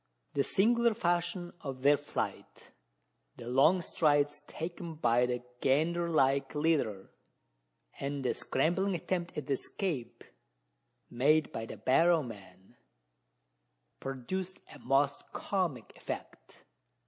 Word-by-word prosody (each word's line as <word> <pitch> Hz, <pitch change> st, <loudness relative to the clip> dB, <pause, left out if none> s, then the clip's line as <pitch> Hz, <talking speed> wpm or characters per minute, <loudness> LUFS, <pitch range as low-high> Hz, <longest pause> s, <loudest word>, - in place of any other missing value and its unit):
The 140 Hz, -, +2 dB
singular 235 Hz, +5 st, +3 dB
fashion 175 Hz, -2 st, -1 dB
of 135 Hz, -2 st, -6 dB
their 145 Hz, +1 st, +7 dB
flight 145 Hz, 0 st, -5 dB, 0.7 s
the 120 Hz, -, -9 dB
long 155 Hz, +9 st, +4 dB
strides 145 Hz, -2 st, +2 dB
taken 170 Hz, 0 st, -6 dB
by 120 Hz, -4 st, +3 dB
the 125 Hz, 0 st, -2 dB, 0.2 s
gander 165 Hz, +6 st, +2 dB
like 135 Hz, -3 st, +2 dB
leader, 150 Hz, -11 st, 0 dB, 0.9 s
and 140 Hz, -1 st, -3 dB
the -, -, +2 dB
scrambling 180 Hz, +7 st, 0 dB
attempt 175 Hz, 0 st, -3 dB
at 150 Hz, -, -4 dB
escape 140 Hz, -, -3 dB, 0.9 s
made 145 Hz, +5 st, +3 dB
by 115 Hz, 0 st, -5 dB
the -, -, -8 dB
barrow 160 Hz, -, +4 dB
man 95 Hz, -5 st, -12 dB, 1.2 s
produced 175 Hz, +9 st, -4 dB, 0.2 s
a -, -, -12 dB
most 140 Hz, +2 st, +2 dB
comic 175 Hz, -, -2 dB
effect. -, -, -8 dB
145 Hz, 110 wpm, -32 LUFS, 130-175 Hz, 1.2 s, their